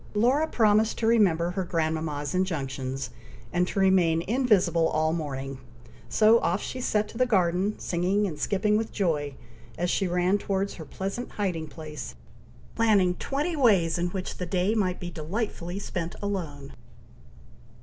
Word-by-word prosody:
Laura 260 +9 +3
promised 220 -4 +3
to 225 - -1
remember 185 -7 +3
her 190 +1 -2
grandmama's 160 -4 -2
injunctions, 135 -8 -2 0.4
and 180 0 +2
to 195 - -2
remain 180 -4 +3
invisible 210 -8 +2
all 155 0 +1
morning; 135 -4 -4 0.5
so 220 +1 +5
off 175 0 0
she 255 - -5
set 210 -3 +1
to 225 - -10
the 255 - +5
garden, 190 -1 +1
singing 185 +4 0
and 160 -6 -4
skipping 210 +5 +1
with 225 0 -2
joy, 150 -8 -1 0.4
as 175 +1 0
she 195 - +1
ran 180 +3 +2
towards 195 0 -1
her 160 - -9
pleasant 195 - -5
hiding 180 -6 -2
place, 150 - -8 0.6
planning 205 -6 +3
twenty 290 - -2
ways 190 - +3
in 175 - +1
which 185 +1 -5
the 180 - -4
day 185 +4 +1
might 185 -5 0
be 175 -1 -6
delightfully 175 +2 -4
spent 175 -4 -4
alone. 155 -9 -4
180 Hz, 150 wpm, -27 LUFS, 160-210 Hz, 0.6 s, so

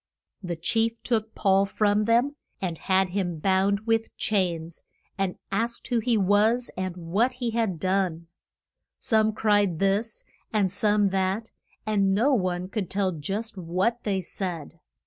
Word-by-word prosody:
The 175 -3 -3
chief 225 +7 0
took 220 -2 -1
Paul 195 0 +3
from 210 +1 +2
them, 240 +6 +2 0.2
and 180 -3 -2
had 190 0 +2
him 175 -3 -2
bound 195 +4 +2
with 225 0 -1
chains, 170 -5 -1 0.3
and 195 -1 -2
asked 230 +5 -2
who 240 -2 +2
he 230 0 +1
was 210 +5 +3
and 185 -1 -3
what 195 +9 +1
he 245 -2 -3
had 220 -7 -1
done. 185 -3 0 0.7
Some 220 -1 +2
cried 205 -5 +2
this, 200 +4 0 0.3
and 200 -4 +1
some 205 0 +2
that, 195 +4 -1 0.3
and 200 -3 +2
no 255 +8 +3
one 185 -5 0
could 195 -2 -3
tell 195 -1 0
just 195 +7 -4
what 185 +8 -1
they 195 -3 0
said. 170 -3 -5
200 Hz, 145 wpm, -26 LUFS, 185-220 Hz, 0.7 s, Paul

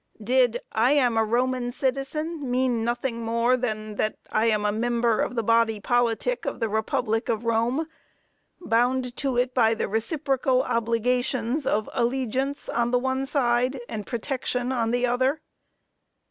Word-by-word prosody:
Did 245 0 +2
"I 235 +5 +3
am 250 -5 +3
a 225 - +3
Roman 245 +2 0
citizen," 275 +3 -2
mean 245 -2 +1
nothing 240 0 -2
more 230 +2 +2
than 215 -4 -4
that 215 - -1
I 220 +1 +2
am 210 -2 +1
a 210 - +2
"member" 235 +1 +1
of - - -2
the 230 - 0
body 230 -1 +2
politic 245 - 0
of - - -4
the 225 -2 0
republic 220 +1 -1
of 225 0 -1
Rome, 230 +7 +1 0.7
bound 250 -3 +1
to 270 -3 -1
it 250 +1 +1
by 225 -3 +3
the - - -2
reciprocal 260 - 0
obligations 245 +3 0
of 215 +1 +1
allegiance 265 +3 -1
on 235 0 0
the 250 - +3
one 260 +1 -1
side, 255 -1 +1
and 215 -3 -6
protection 250 0 -2
on 235 -3 0
the 245 +1 +1
other? 260 +5 0
245 Hz, 155 wpm, -25 LUFS, 230-260 Hz, 0.7 s, I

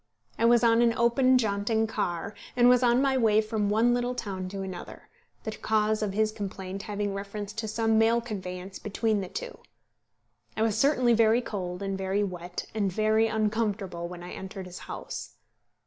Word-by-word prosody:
I 230 - +3
was 235 0 +5
on 230 0 +5
an 230 -1 +3
open 255 +2 +4
jaunting 220 0 +1
car, 200 -3 -3 0.2
and 245 -1 +5
was 250 0 +6
on 245 +1 +4
my 270 -1 +2
way 215 -2 +4
from 215 -1 0
one 225 +3 +3
little 245 +1 -1
town 190 -5 -4
to 195 0 -5
another, 185 -2 -8 0.3
the 220 - -3
cause 215 0 0
of 205 -2 -1
his 215 +1 +2
complaint 195 -2 -6
having 205 -1 -3
reference 200 +1 -5
to 220 0 -4
some 225 0 +2
mail 225 +1 +4
conveyance 190 -4 -6
between 210 0 0
the 185 - -6
two. - - -6 1.0
I 220 - +2
was 220 -2 +1
certainly 250 0 +3
very 225 +1 +4
cold, 180 -3 -4
and 195 0 -2
very 195 +2 0
wet, 180 -2 -5
and 205 -3 0
very 215 +3 +2
uncomfortable 210 -5 -1
when 175 0 -9
I 180 - -8
entered 190 0 -7
his 180 0 -9
house. - - -7
215 Hz, 180 wpm, -28 LUFS, 195-230 Hz, 1.0 s, was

